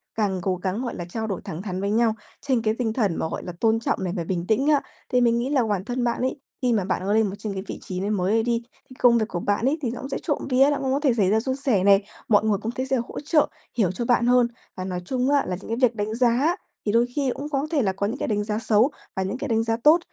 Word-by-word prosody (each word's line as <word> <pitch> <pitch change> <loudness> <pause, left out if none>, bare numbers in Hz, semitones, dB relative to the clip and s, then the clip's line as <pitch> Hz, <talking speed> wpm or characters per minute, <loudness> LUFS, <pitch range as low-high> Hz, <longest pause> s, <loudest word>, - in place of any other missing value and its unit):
Càng 200 -4 0
cố 185 +1 0
gắng, 190 +5 -3
gọi 240 - -4
là, 175 - -5
trao 220 +3 -3
đổi 195 -4 -3
thẳng 160 +3 -6
thắn 190 -2 -4
với 200 - -1
nhau, 225 0 +2 0.3
trên 260 -5 +1
cái 215 -1 +1
tinh 225 -3 -1
thần 205 -9 +1
mà, - - -1
gọi - - -5
là, 180 - -6
tôn 225 0 +3
trọng 225 - -1
này 180 -2 -2
và 170 - -1
bình 175 0 -3
tĩnh 225 +6 +2
á, 295 -2 +4 0.3
thì 250 0 +3
mình 235 -1 +3
nghĩ 245 +3 -1
là 275 -4 +2
bản 195 -1 -1
thân 245 +1 -2
bạn 240 0 0
ấy, 260 +2 -1 0.2
khi 245 -2 +2
mà 200 -4 +1
bạn 190 - -1
có 205 - +1
lên 220 0 +3
một 195 - -5
trên 210 -2 -4
cái 190 -1 -4
vị - - -6
trí 185 -1 -5
này 200 +2 -2
mới 195 -1 0
ấy 225 0 +3
đi, 235 0 0 0.3
thì 255 - -13
công 240 -1 +6
việc 220 -2 0
của 175 - -4
bạn 205 +5 0
ấy 280 +4 +2
thì 245 - -1
nó 240 - -6
cũng 270 - -6
sẽ - - -2
trộm 295 -4 -2
vía, 265 +3 +5
đã 290 - +1
cũng 265 -1 0
có 280 - +1
thể 280 -5 +3
xảy 205 -5 +2
ra 215 +2 +3
suôn 260 +3 -2
sẻ 255 -9 +1
này, 200 0 +5 0.2
mọi 210 -2 +4
người 210 -2 +2
công 225 - -2
ty 260 +2 -3
sẽ 265 - 0
hỗ 235 - -4
trợ, 300 0 +2 0.3
hiểu 195 -7 +3
cho 230 +6 -4
bạn 240 0 +3
hơn. 245 -1 +5 0.3
Và 185 - -5
nói 180 -1 -3
chung 255 +4 0
á 285 -1 +3
là 180 - -1
những - - -11
cái 230 - -1
việc 230 - -21
đánh 210 +1 -2
giá 255 +8 +3 0.3
thì 205 - +1
đôi 235 +1 +4
khi 275 -4 +1
cũng 290 +2 -5
có 280 0 -1
thể 295 -4 +2
là 190 -3 +1
có 200 +1 -2
những 225 - -3
cái - - -3
đánh 210 -1 0
giá 210 +1 -2
xấu 225 +5 +3 0.2
và 190 - 0
những 195 +6 -3
cái 285 - -4
đánh 225 -1 +1
giá 225 0 0
tốt. 315 +4 +7
225 Hz, 320 wpm, -24 LUFS, 200-255 Hz, 0.3 s, tốt